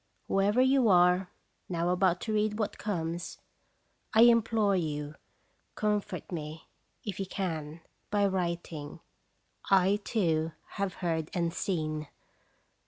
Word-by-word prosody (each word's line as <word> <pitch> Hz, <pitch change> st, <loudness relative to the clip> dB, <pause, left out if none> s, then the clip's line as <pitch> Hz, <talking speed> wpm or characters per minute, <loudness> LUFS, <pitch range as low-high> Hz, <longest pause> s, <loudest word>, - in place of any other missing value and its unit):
Whoever 205 Hz, +5 st, +3 dB
you 260 Hz, -3 st, +4 dB
are, 180 Hz, 0 st, +4 dB, 0.4 s
now 170 Hz, -1 st, 0 dB
about 180 Hz, -1 st, +2 dB
to 220 Hz, -, -2 dB
read 210 Hz, 0 st, +1 dB
what 215 Hz, -2 st, -2 dB
comes, 175 Hz, -4 st, -3 dB, 0.8 s
I 220 Hz, -, +7 dB
implore 225 Hz, -3 st, +4 dB
you 150 Hz, -4 st, -2 dB, 0.6 s
com 210 Hz, -1 st, +1 dB
fort -, -, -8 dB
me, 155 Hz, -1 st, -6 dB, 0.4 s
if 200 Hz, -3 st, -4 dB
you 195 Hz, -, -2 dB
can, 165 Hz, -5 st, -4 dB, 0.3 s
by 205 Hz, -1 st, +2 dB
writing: 170 Hz, -5 st, -3 dB, 0.4 s
" -, -, -19 dB
I, 195 Hz, +1 st, +4 dB
too, 165 Hz, -8 st, 0 dB, 0.2 s
have 200 Hz, -2 st, -3 dB
heard 160 Hz, -2 st, -1 dB
and 170 Hz, -2 st, 0 dB
seen!" 155 Hz, -6 st, -2 dB
180 Hz, 125 wpm, -30 LUFS, 165-205 Hz, 0.8 s, I